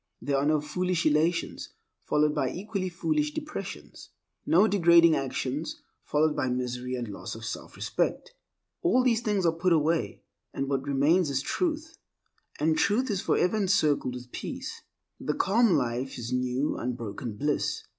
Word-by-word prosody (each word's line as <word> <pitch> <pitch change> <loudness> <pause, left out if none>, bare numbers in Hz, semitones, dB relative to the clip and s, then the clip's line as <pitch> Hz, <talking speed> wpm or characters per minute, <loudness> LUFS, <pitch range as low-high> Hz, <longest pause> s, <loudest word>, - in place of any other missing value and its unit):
There 140 - -1
are 140 +2 +1
no 155 0 +3
foolish 180 +3 -1
elations 155 +3 +1 0.4
followed 150 0 +2
by - - 0
equally 195 -1 -3
foolish 300 - -1
depressions; 305 -1 -7 0.4
no 190 +6 +5
degrading 170 -4 +6
actions 135 +2 -3 0.2
followed 150 +1 +2
by 130 - 0
misery 125 0 -2
and 120 -2 -4
loss 100 +1 -6
of 110 - -10
selfrespect. 115 - -3 0.5
All 255 -8 +3
these 235 -3 +2
things 210 -5 0
are 165 - +5
put 170 +2 +2
away, 160 +1 0 0.3
and 135 - -2
what 135 0 -1
remains 145 +5 +3
is 135 -1 -1
Truth, 320 - -2 0.6
and 155 +1 +2
Truth 230 +9 +2
is 195 -2 -1
forever 180 +5 +1
encircled 150 -10 +2
with 125 0 -9
peace. - - -6 0.4
The - - -2
calm 220 +1 +3
life 125 -1 -1
is 120 0 -4
new 125 +3 0
unbroken 115 -2 -4
bliss. 145 +3 -1
155 Hz, 150 wpm, -28 LUFS, 130-190 Hz, 0.6 s, degrading